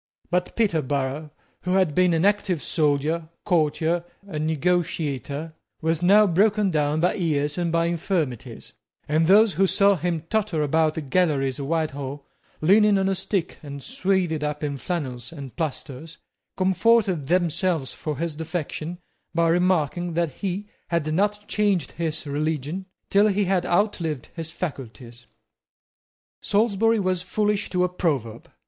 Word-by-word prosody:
But 180 Hz, 0 st, 0 dB
Peterborough, 150 Hz, -, 0 dB, 0.3 s
who 180 Hz, -, -1 dB
had 185 Hz, -5 st, +3 dB
been 180 Hz, 0 st, +3 dB
an 165 Hz, +3 st, +2 dB
active 200 Hz, -5 st, +1 dB
soldier, 155 Hz, +2 st, 0 dB, 0.2 s
courtier, 170 Hz, -1 st, +1 dB, 0.2 s
and 155 Hz, -5 st, -3 dB
negotiator, 160 Hz, -3 st, -1 dB, 0.3 s
was 160 Hz, 0 st, 0 dB
now 205 Hz, +4 st, +6 dB
broken 205 Hz, +2 st, +2 dB
down 150 Hz, -1 st, +1 dB
by 180 Hz, -, +3 dB
years 150 Hz, -6 st, 0 dB
and 175 Hz, -2 st, -1 dB
infirmities; 165 Hz, -, -2 dB, 0.3 s
and 155 Hz, +2 st, +2 dB
those 205 Hz, +2 st, +6 dB
who 195 Hz, +4 st, +3 dB
saw 200 Hz, +1 st, +4 dB
him 175 Hz, -2 st, -2 dB
totter 210 Hz, -8 st, 0 dB
about 155 Hz, +1 st, +2 dB
the 160 Hz, -, -3 dB
galleries 145 Hz, -3 st, +1 dB
of 140 Hz, -, -4 dB
Whitehall, 145 Hz, -3 st, -2 dB, 0.4 s
leaning 205 Hz, +5 st, +5 dB
on 190 Hz, 0 st, +1 dB
a -, -, +2 dB
stick 190 Hz, -1 st, -2 dB
and 140 Hz, -2 st, -8 dB
swathed 190 Hz, -, 0 dB
up 150 Hz, 0 st, -3 dB
in 145 Hz, -2 st, -2 dB
flannels 130 Hz, -8 st, -4 dB
and 140 Hz, -6 st, -9 dB
plasters, 155 Hz, 0 st, -5 dB, 0.4 s
comforted 190 Hz, -4 st, +2 dB
themselves 170 Hz, -3 st, +1 dB
for 150 Hz, -3 st, -4 dB
his 165 Hz, -1 st, -3 dB
defection 160 Hz, +1 st, -4 dB, 0.4 s
by 165 Hz, 0 st, +3 dB
remarking 175 Hz, -1 st, +1 dB
that 170 Hz, -3 st, +1 dB
he 195 Hz, +7 st, -4 dB, 0.2 s
had 155 Hz, -3 st, -1 dB
not 210 Hz, +4 st, 0 dB
changed 205 Hz, -5 st, +1 dB
his 160 Hz, -2 st, -3 dB
religion 155 Hz, +5 st, -2 dB, 0.2 s
till 200 Hz, +2 st, +5 dB
he 205 Hz, 0 st, +1 dB
had 185 Hz, -1 st, +1 dB
outlived 170 Hz, -, 0 dB
his 165 Hz, -2 st, -4 dB
faculties. 125 Hz, -7 st, -7 dB, 1.1 s
Salisbury 225 Hz, +1 st, +2 dB
was 185 Hz, -2 st, 0 dB
foolish 205 Hz, +2 st, -1 dB
to 180 Hz, -1 st, +1 dB
a -, -, +3 dB
proverb. 140 Hz, -, -2 dB
170 Hz, 140 wpm, -24 LUFS, 150-190 Hz, 1.1 s, now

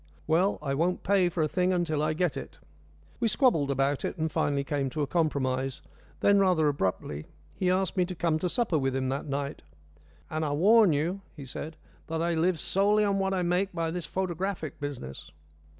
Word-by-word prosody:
"Well, 180 Hz, +5 st, +2 dB
I 135 Hz, -2 st, -1 dB
won't 170 Hz, +6 st, 0 dB
pay 190 Hz, -2 st, +3 dB
for 170 Hz, -2 st, -1 dB
a -, -, +2 dB
thing 180 Hz, +5 st, +1 dB
until 170 Hz, -4 st, 0 dB
I 155 Hz, +1 st, +1 dB
get 170 Hz, -2 st, 0 dB
it." -, -, -7 dB, 0.6 s
We 235 Hz, -, +2 dB
squabbled 215 Hz, -, +3 dB
about 140 Hz, +1 st, 0 dB
it, -, -, -3 dB
and 160 Hz, -1 st, -1 dB
finally 140 Hz, -1 st, 0 dB
came 140 Hz, -1 st, -1 dB
to 150 Hz, +3 st, -2 dB
a -, -, +1 dB
compromise. 135 Hz, -5 st, -1 dB, 0.4 s
Then 200 Hz, 0 st, +5 dB
rather 180 Hz, -5 st, +3 dB
abruptly 95 Hz, -, -2 dB, 0.3 s
he 185 Hz, -, 0 dB
asked 185 Hz, 0 st, +1 dB
me 180 Hz, -2 st, +2 dB
to 180 Hz, 0 st, -6 dB
come 165 Hz, -2 st, +1 dB
to 180 Hz, -, -1 dB
supper 200 Hz, -7 st, +1 dB
with 135 Hz, -1 st, 0 dB
him 130 Hz, -1 st, -1 dB
that 135 Hz, +2 st, -3 dB
night. 140 Hz, +1 st, -3 dB, 0.7 s
"And 155 Hz, 0 st, -2 dB
I 145 Hz, -2 st, 0 dB
warn 205 Hz, +5 st, +5 dB
you," 165 Hz, +7 st, -1 dB
he 145 Hz, -4 st, -8 dB
said, 155 Hz, +5 st, -6 dB, 0.3 s
"that 160 Hz, 0 st, -2 dB
I 170 Hz, +1 st, +1 dB
live 165 Hz, +1 st, +1 dB
solely 205 Hz, +4 st, +3 dB
on 200 Hz, -1 st, +1 dB
what 190 Hz, 0 st, 0 dB
I 180 Hz, -, 0 dB
make 180 Hz, +3 st, 0 dB
by 165 Hz, -2 st, -1 dB
this 175 Hz, -2 st, -4 dB
photographic 185 Hz, -3 st, -3 dB
business." 140 Hz, -, -6 dB
160 Hz, 200 wpm, -28 LUFS, 145-185 Hz, 0.7 s, Then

